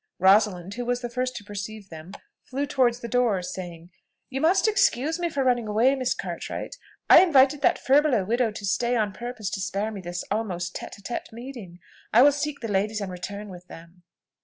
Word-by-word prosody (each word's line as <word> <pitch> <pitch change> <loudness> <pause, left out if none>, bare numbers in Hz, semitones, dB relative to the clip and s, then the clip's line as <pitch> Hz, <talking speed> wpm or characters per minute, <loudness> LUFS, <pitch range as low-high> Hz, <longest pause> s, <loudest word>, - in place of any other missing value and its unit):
Rosalind, 190 -1 +3
who 245 +2 -5
was 245 0 -1
the 240 -1 -5
first 255 +1 -2
to 210 - -7
perceive 205 0 -7
them, 160 +3 -10 0.3
flew 275 +2 -3
towards 250 -3 +1
the 235 - -5
door, 235 -6 +1
saying, 175 -1 -7 0.4
"You 270 +1 -3
must 375 +6 +3
excuse 325 - +2
me 345 -1 -1
for 285 -4 -1
running 245 -3 +1
away, 225 +6 +3
Miss 255 -2 -1
Cartwright. - - -6 0.3
I - - +9
invited 285 -5 +4
that - - +3
furbelow 270 -7 +3
widow 235 +3 +1
to 210 -1 -7
stay 240 +5 +1
on 210 -4 0
purpose 240 -2 -5
to 195 - -3
spare 195 +4 -2
me 200 -3 -7
this 175 0 -5
almost 180 -5 -2
tête - - -7
à - - -16
tête 240 - -5
meeting. 230 -7 -9 0.3
I 235 +4 +7
will 290 - +7
seek 290 0 -3
the 230 - -3
ladies 210 +1 0
and 200 -2 -4
return 200 +3 -7
with 180 -1 -11
them." 170 +1 -14
220 Hz, 205 wpm, -25 LUFS, 195-255 Hz, 0.4 s, I